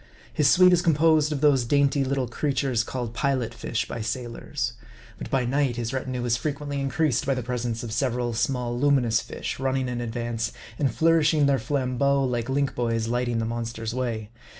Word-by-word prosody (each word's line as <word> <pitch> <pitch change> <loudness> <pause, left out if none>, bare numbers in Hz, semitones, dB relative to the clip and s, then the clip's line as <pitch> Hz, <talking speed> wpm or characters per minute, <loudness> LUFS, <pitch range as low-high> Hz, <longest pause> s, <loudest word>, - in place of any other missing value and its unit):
His 150 -3 +3
suite 180 +2 +6
is 175 - +4
composed 155 -2 +3
of 145 -2 -2
those 140 -4 +4
dainty 140 +2 +2
little 135 -1 -1
creatures 130 -2 0
called 120 -2 -4
Pilot 130 -2 0
fish 120 - -3
by 115 - -5
sailors. 120 +1 -3 0.5
But - - -6
by 130 -2 +1
night 135 0 +1
his 120 +1 -3
retinue 130 -2 -3
is 120 -1 +2
frequently 140 +2 -3
in 135 - -1
creased 145 -1 +1
by 135 - +2
the 125 - -3
presence 120 -1 -3
of 115 - -5
several 120 0 -1
small 120 +1 -1
luminous 125 -4 +2
fish, - - -6
run 135 0 0
ning 130 -1 -1
in 120 -1 -3
advance, 115 -1 -3 0.3
and 140 - +2
nourishing 160 -2 +4
their 140 -1 +3
flambeaux 135 +2 +1
like 120 -2 -1
link 140 0 0
boys 115 -2 -1
lighting 120 0 0
the 115 - 0
monster's 115 -1 -4
way. 115 -4 -3
130 Hz, 190 wpm, -25 LUFS, 120-140 Hz, 0.5 s, suite